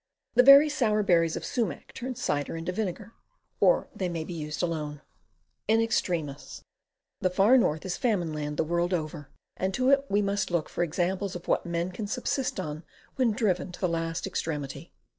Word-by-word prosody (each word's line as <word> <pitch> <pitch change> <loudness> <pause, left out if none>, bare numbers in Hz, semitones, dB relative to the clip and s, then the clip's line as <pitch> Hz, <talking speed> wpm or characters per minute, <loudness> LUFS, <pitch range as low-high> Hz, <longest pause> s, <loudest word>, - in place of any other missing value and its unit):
The - - +7
very 275 +3 +9
sour 220 -8 +1
berries 165 -4 +3
of - - -5
sumac 235 -3 -3
turn 255 0 -5
cider 145 - -2
into 165 +2 -3
vinegar, 205 +3 -4 0.5
or - - +4
they 185 -2 -2
may 165 -2 -3
be 165 - -7
used 150 0 -4
alone. 150 -4 -3 0.7
IN 225 +1 +4
EXTREMIS 170 -10 -2 0.6
The 185 - +1
Far 200 +7 +5
North 160 -11 +2
is 185 - -2
Famine 190 -10 0
Land, 150 -1 -4
the - - +2
world 175 +3 0
over, 155 -3 -5 0.3
and 190 0 -1
to 255 +1 +3
it 275 0 +4
we 205 +1 +2
must 200 0 -1
look 170 -3 -1
for 175 - -1
examples 180 +4 -1
of 175 - -8
what - - +1
men 170 +1 -2
can 205 +3 -5
subsist 255 +3 -2
on 155 +1 -5 0.3
when 255 -3 +3
driven 205 -5 0
to - - -10
the 185 - +1
last 165 0 -2
extremity. 150 -7 -4
180 Hz, 185 wpm, -28 LUFS, 165-215 Hz, 0.7 s, very